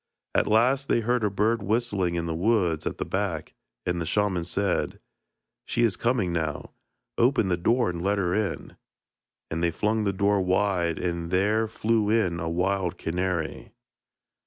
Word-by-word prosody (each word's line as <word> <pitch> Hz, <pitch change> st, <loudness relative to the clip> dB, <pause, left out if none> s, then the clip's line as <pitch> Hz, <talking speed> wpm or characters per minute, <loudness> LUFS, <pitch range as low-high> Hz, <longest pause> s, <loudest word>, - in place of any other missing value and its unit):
At -, -, +2 dB
last 125 Hz, +6 st, +3 dB
they 115 Hz, -, +2 dB
heard 120 Hz, +1 st, 0 dB
a 105 Hz, -, +2 dB
bird 105 Hz, +4 st, +1 dB
whistling 100 Hz, -4 st, 0 dB
in 85 Hz, -1 st, -1 dB
the 85 Hz, -, -2 dB
woods 90 Hz, -3 st, +1 dB
at -, -, -3 dB
the -, -, -3 dB
back, 95 Hz, -6 st, -3 dB, 0.3 s
and 90 Hz, -1 st, -1 dB
the -, -, -2 dB
shaman 100 Hz, -3 st, +1 dB
said: 95 Hz, +1 st, -1 dB, 0.7 s
'She 120 Hz, -, +1 dB
is 110 Hz, -5 st, +2 dB
coming 115 Hz, -8 st, 0 dB
now; 80 Hz, -3 st, -3 dB, 0.5 s
open 120 Hz, -4 st, +3 dB
the 90 Hz, -, +2 dB
door 115 Hz, +4 st, +2 dB
and 85 Hz, -1 st, -5 dB
let 100 Hz, +3 st, +1 dB
her 90 Hz, -3 st, 0 dB
in,' 105 Hz, -4 st, -2 dB, 0.7 s
and 80 Hz, +1 st, -2 dB
they 85 Hz, -, +3 dB
flung 105 Hz, +6 st, 0 dB
the 100 Hz, -, +1 dB
door 100 Hz, +1 st, +2 dB
wide, 95 Hz, -3 st, +1 dB
and 85 Hz, -2 st, -3 dB
there 105 Hz, +5 st, +2 dB
flew 110 Hz, -1 st, 0 dB
in 100 Hz, -7 st, +1 dB
a 80 Hz, -, -2 dB
wild 90 Hz, +1 st, 0 dB
canary. 90 Hz, -1 st, -3 dB
95 Hz, 170 wpm, -26 LUFS, 85-110 Hz, 0.7 s, last